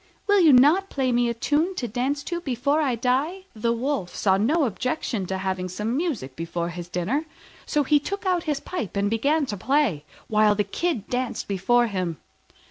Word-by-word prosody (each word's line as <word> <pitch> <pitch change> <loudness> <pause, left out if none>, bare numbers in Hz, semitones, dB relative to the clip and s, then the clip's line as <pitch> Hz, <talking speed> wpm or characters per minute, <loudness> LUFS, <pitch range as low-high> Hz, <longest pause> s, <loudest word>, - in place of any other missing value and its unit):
Will 410 -1 +4
you 330 -5 +7
not 300 +10 +5
play 265 -2 0
me 240 0 +2
a - - 0
tune 310 +10 0
to 245 - -3
dance 260 +6 -2
to 345 -1 -4
before 280 +1 0
I 265 -5 +1
die?" 270 +11 0
The 230 +2 0
Wolf 240 -5 -2
saw 190 -2 +3
no 280 - +2
objection 240 - -2
to 190 - -2
having 190 -1 -2
some 210 +6 -2
music 265 - -2
before 170 +2 -3
his 175 0 -7
dinner: 210 - -1 0.4
so 295 - +1
he 295 +2 +4
took 400 +7 -5
out 360 -2 +1
his 295 -3 -1
pipe 285 - -5
and 200 +1 +1
began 285 +7 +2
to 210 -5 -4
play, 250 - +1 0.2
while 215 -1 +4
the 210 - +1
Kid 240 - -2
danced 250 -2 -2
before 220 +5 +2
him. 185 -7 -3
245 Hz, 195 wpm, -24 LUFS, 200-295 Hz, 0.4 s, you